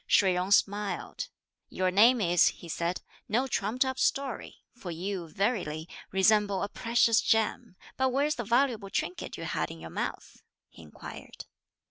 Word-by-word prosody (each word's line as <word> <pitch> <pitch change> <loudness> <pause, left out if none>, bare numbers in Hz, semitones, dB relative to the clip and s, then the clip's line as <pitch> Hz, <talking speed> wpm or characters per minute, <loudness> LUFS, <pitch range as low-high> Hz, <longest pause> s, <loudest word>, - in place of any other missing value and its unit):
Shih 190 -2 +4
Jung 180 +1 -1
smiled. 205 0 0 0.4
"Your 185 0 0
name 225 +5 +5
is," 175 -2 +4
he 175 - -4
said, 170 +2 -2 0.3
"no 240 +5 +2
trumped 250 +1 0
up 260 0 -3
story; 270 -3 -1
for 235 -7 -9
you, 175 +1 -4
verily, 175 -5 -1 0.2
resemble 200 0 +3
a 200 - -2
precious 230 0 +3
gem; 220 -1 0 0.2
but 265 0 +2
where's 280 +4 +1
the 240 - -4
valuable 235 -2 +1
trinket 180 -1 -3
you - - -6
had - - -2
in 80 - -9
your 80 0 -9
mouth?" - - -5 0.3
he - - -15
inquired. 75 -2 -10
205 Hz, 155 wpm, -29 LUFS, 180-240 Hz, 0.4 s, name